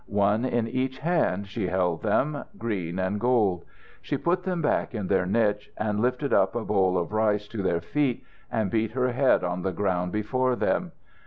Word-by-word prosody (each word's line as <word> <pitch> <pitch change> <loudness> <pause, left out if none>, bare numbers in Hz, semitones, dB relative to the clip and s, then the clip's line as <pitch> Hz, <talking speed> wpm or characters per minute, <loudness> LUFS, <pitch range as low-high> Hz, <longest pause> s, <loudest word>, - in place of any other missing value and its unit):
One 105 +3 +2
in 120 -3 0
each 130 +2 -2
hand, 155 - 0
she 100 -1 -3
held 90 -3 0
them, 140 +7 0
green 95 -7 -3
and 95 +2 -1
gold. 105 -8 +2 0.4
She - - -2
put 180 +2 0
them 180 -1 -2
back 145 -5 0
in 105 -3 -2
their 90 -1 +1
niche, 105 0 +1
and 105 -1 -1
lifted 125 +4 0
up - - +3
a 120 - -2
bowl 95 -3 +2
of 90 +4 -2
rice 105 -1 +1
to 110 - -4
their 85 -3 0
feet, 135 - -1 0.3
and 110 -4 0
beat 110 -1 0
her 125 0 +1
head 130 -3 +3
on 90 0 -2
the 95 - -1
ground 90 -2 -1
before 125 +5 0
them. - - 0
105 Hz, 190 wpm, -26 LUFS, 95-125 Hz, 0.4 s, up